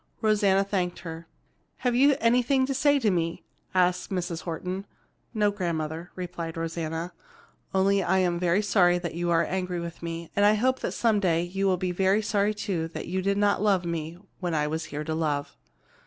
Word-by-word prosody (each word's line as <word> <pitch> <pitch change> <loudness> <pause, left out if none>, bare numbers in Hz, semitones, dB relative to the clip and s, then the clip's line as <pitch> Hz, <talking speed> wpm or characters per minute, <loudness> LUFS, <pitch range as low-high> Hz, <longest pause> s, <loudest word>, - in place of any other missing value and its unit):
Rosanna 205 -3 +3
thanked 185 -4 -2
her. 165 -1 -8 0.5
"Have 250 -2 0
you 275 +3 +5
anything 250 +3 +3
to 275 - -2
say 285 +2 +3
to 225 -7 +2
me?" 165 -2 -1 0.3
asked 180 0 +2
Mrs. 175 -3 -3
Horton. 185 +3 -4 0.4
"No, 210 -3 +2
grandmother," 165 -3 -3
replied 170 -2 -5
Rosanna, 165 +1 -3 0.6
"only 195 +1 +3
that 185 - -2
I 190 - +4
am 175 -2 +1
very 180 +3 +2
sorry 180 -4 +4
that 175 -2 -4
you 175 +1 -2
are 170 0 +3
angry 180 -1 -2
with 170 0 -7
me, 170 0 -5
and 205 - +3
I 210 +1 +6
hope 260 +4 +1
some 225 -3 +1
day 170 -4 +2
you 195 +3 -1
will 185 -1 +2
be 180 0 -2 0.3
sorry 210 0 +1
too 180 -6 -2
that 165 - -7
you 190 +1 -1
did 200 +1 0
not 205 -1 +2
love 195 -4 +2
me 165 0 -4 0.2
when 175 -3 -2
I 150 -1 +1
was 160 +2 -2
here 150 +1 -5
to 160 +1 -3
love." 150 -3 -1
180 Hz, 190 wpm, -27 LUFS, 170-205 Hz, 0.6 s, I